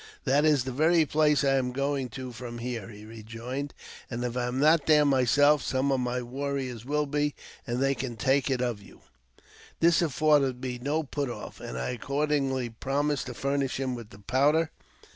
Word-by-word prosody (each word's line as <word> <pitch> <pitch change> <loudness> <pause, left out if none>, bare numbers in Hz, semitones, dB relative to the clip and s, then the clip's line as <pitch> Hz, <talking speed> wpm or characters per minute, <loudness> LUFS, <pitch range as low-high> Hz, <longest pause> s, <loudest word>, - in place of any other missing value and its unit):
That's 145 0 +3
the 130 - -4
very 160 +5 +3
place 150 0 +3
I 135 -1 +3
am 125 -1 0
going 140 0 -1
to 130 -1 -7
from 120 0 -7
here," 120 -3 -5
he 105 -1 -11
rejoined; 115 +5 -6 0.2
*' - - -16
and, 120 0 -4
if 120 -1 -3
I 125 -1 0
am 125 +2 -2
not 155 0 +4
there 150 -1 +6
myself, 145 +2 +4
some 135 +1 0
of 135 - +2
my 125 0 -1
warriors 130 -2 -4
will 150 +2 0
be, 145 0 -1 0.3
and 120 0 -1
they 135 +1 +2
can 130 -2 -4
take 135 +3 +2
it 130 -2 0
of 120 -4 -2
you.'' - - -16 0.8
This 170 +1 +4
afforded 145 -4 +2
me 125 -1 -4
no 150 +4 0
put 140 -1 -3
off, 120 - -8
and 60 - -6
I 60 - -2
accordingly 140 0 -1
promised 140 +5 -1
to 125 - -5
iurnish 140 0 -1
him 130 -1 -1
with 115 -3 -8
the 100 - -14
powder. 145 +10 +2
135 Hz, 195 wpm, -28 LUFS, 125-145 Hz, 0.8 s, there